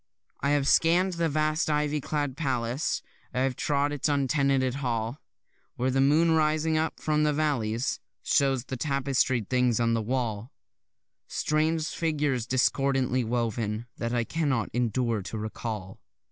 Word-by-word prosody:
I 140 - 0
have 145 -1 +2
scann'd 180 +5 +4
the 170 -1 0
vast 155 +1 0
ivy 150 0 0
clad 145 -2 -2
palace, 130 -3 -1 0.3
I 125 - +1
have 130 -1 +1
trod 145 +1 0
its 145 +1 -1
untenanted 135 -2 +1
hall, 115 0 -2 0.5
Where 130 +2 0
the 135 +1 +2
moon 155 +5 +4
writhing 155 0 +2
up 160 +1 -1
from 150 -1 +1
the 150 0 +3
valleys 125 -6 0 0.2
Shows 135 -3 +2
the 130 - -5
tapestried 135 -4 0
things 125 -2 +2
on 115 -1 +2
the 115 - +1
wall; 115 0 -2 0.8
Strange 155 +1 0
figures 150 -7 -1
discordantly 130 0 +1
woven, 115 -1 -2
that 115 0 -2
I 120 -1 +1
cannot 140 -5 -1
endure 120 -2 0
to 105 +4 -6
recall. 105 -3 -5
135 Hz, 145 wpm, -27 LUFS, 120-150 Hz, 0.8 s, scann'd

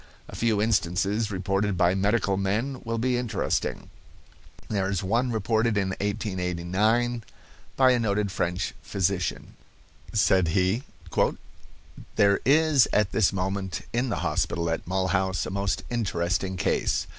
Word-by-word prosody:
A - - -10
few 115 -3 +1
instances 105 +1 +1
reported 95 0 -1
by 85 +1 +3
medical 100 +1 +1
men 110 +8 -1
will 115 0 -2
be 125 +2 +1
interesting. 120 -3 -2 0.8
There 100 -3 -1
is 100 -1 -1
one 115 +7 +1
reported 110 0 +1
in 95 -2 +1
1889 100 +4 -1 0.5
by 130 -1 +5
a 125 - +2
noted 105 -3 0
French 90 0 -2
physician. 95 -2 -2 0.6
Said 95 -4 +3
he: 95 +6 +1 1.3
"There 100 -1 +4
is 150 -2 +5
at 105 -1 +2
this 110 -4 +3
moment 95 -1 -3
in 125 +2 0
the 105 - -2
hospital 85 -1 0
at 80 - -3
Mulhouse 95 0 0
a - - -5
most 100 0 -1
interesting 95 -4 -1
case. 80 - 0
100 Hz, 130 wpm, -26 LUFS, 95-115 Hz, 1.3 s, by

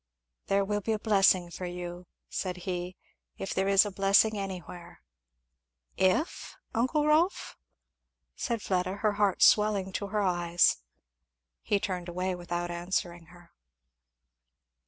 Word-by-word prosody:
"There 195 0 +2
will 205 +1 -1
be 220 +3 -1
a - - 0
blessing 195 -5 +3
for 180 +2 -6
you," 175 0 -7 0.2
said 185 -1 -4
he, 180 0 -4 0.4
"if 195 - -4
there 190 0 0
is 195 +1 +5
a 205 - -4
blessing 200 +3 +3
anywhere!" 180 - -7 0.9
"If, 190 - 0 0.2
uncle 260 +6 +1
Rolf?" 315 +5 +1 0.8
said 235 -5 -3
Fleda, 185 0 -1
her 210 +1 +1
heart 200 -3 +3
swelling 205 -3 +4
to 200 - -3
her 210 0 -1
eyes. 175 -2 +2 0.8
He 205 - 0
turned 185 -3 -4
away 180 +2 -2
without 175 0 -4
answering 175 -1 -3
her. 175 0 -18
190 Hz, 130 wpm, -29 LUFS, 175-205 Hz, 0.9 s, is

